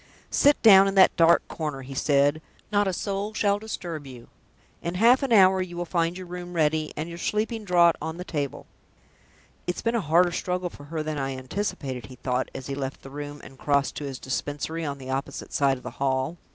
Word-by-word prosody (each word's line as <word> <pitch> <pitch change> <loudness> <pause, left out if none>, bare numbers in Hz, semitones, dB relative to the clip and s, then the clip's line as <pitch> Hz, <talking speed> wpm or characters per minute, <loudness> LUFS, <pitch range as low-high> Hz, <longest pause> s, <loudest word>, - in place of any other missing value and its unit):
"Sit 290 +1 +4
down 195 -3 +8
in 195 - -1
that 190 - +6
dark 170 0 +4
corner," 150 -4 -4
he 135 +1 -8
said. 145 +2 +2 0.3
"Not 205 -1 +2
a - - +1
soul 200 +3 -3
shall 205 -1 +2
disturb 170 -9 -6
you. 125 -3 -12 0.5
In 170 +1 -3
half 235 +7 +5
an 270 -3 -2
hour 190 -3 +6
you 175 -1 -5
will 175 - -2
find 170 0 0
your 185 - -7
room 180 0 -7
ready, 155 -1 +1
and 155 +2 -3
your 170 0 -8
sleeping 220 +4 -1
draught 175 -3 +4
on 160 +2 -4
the 180 - -5
table." 145 -7 -4 1.0
"It's 180 - -3
been 230 - +1
a 235 - +1
harder 175 +2 +3
struggle 180 0 -2
for 145 - -12
her 155 +1 -4
than 155 -1 -3
I 135 -1 -3
anticipated," 130 - -4
he 130 - -11
thought, 125 0 -2
as 130 - -6
he 140 - -4
left 135 -1 -5
the 135 - -10
room, 145 0 -7
and 135 - -13
crossed 140 -1 +1
to - - -5
his 135 -2 -5
Dispensary 145 +5 -3
on 140 -2 -3
the 130 -1 -7
opposite 135 +1 -4
side 135 -2 +2
of 125 - -15
the - - -6
hall. 135 +4 0
160 Hz, 220 wpm, -26 LUFS, 140-185 Hz, 1.0 s, down